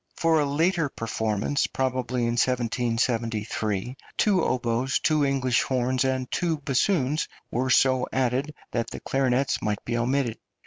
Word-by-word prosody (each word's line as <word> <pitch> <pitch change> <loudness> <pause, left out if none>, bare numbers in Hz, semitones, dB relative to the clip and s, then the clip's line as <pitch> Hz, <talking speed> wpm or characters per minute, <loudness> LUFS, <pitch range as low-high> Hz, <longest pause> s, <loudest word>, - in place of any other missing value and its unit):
For 165 -1 +3
a 150 - +2
later 165 +2 +1
performance, 110 +2 -1
probably 130 -1 -1
in 115 - +1
1773, 115 -2 -1 0.2
two 195 -4 +3
oboes, 125 +1 0
two 155 -2 +2
English 135 -3 +2
horns, 130 0 0
and 130 -1 -1
two 165 -3 0
bassoons 145 +1 +1 0.2
were 130 +2 0
so 130 0 +4
added 130 +3 0 0.2
that 115 -1 -1
the - - -7
clarinets 135 0 0
might 105 -1 -2
be 115 - -2
omitted. 120 -1 0
130 Hz, 135 wpm, -26 LUFS, 120-140 Hz, 0.2 s, so